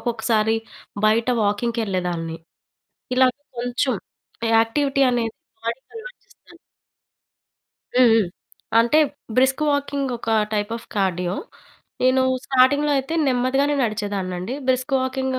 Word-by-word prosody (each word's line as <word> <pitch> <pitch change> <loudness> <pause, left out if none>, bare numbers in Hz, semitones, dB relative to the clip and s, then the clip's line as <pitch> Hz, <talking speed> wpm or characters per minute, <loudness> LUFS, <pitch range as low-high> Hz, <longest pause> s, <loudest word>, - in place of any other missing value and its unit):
ఒక్కొక్కసారి 225 -2 +1 0.5
బయట 225 +2 +3 0.2
వాకింగ్‌‌కెళ్ళేదాన్ని 195 -6 -1 0.8
ఇలా 260 0 +6 0.3
కొంచెం 245 0 0 0.6
యాక్టివిటీ 275 +5 +1
అనేది 230 -2 -1 0.3
బాడీకి 235 +4 -5
అలవాటు - - -9
చేస్తను. 345 - -21 1.4
హ్మ్. 255 -1 +7
హ్మ్. 220 -5 +3 0.5
అంటే 235 +7 +4 0.4
బ్రిస్క్ 265 +3 +3
వాకింగ్ 280 -1 -1
ఒక 225 - -4 0.2
టైప్ 205 +1 -1
అఫ్ 230 - -12
కార్డియో. 180 -2 0 0.7
నేను 255 +1 +4 0.2
స్టార్టింగ్‌లో 280 +3 +3
అయితే 270 +5 -3
నెమ్మదిగానే 270 +3 +1
నడిచేదాన్నండి. 200 -2 -3
Brisk 255 +2 +1
walking 260 0 -1
245 Hz, 100 wpm, -22 LUFS, 215-265 Hz, 1.4 s, హ్మ్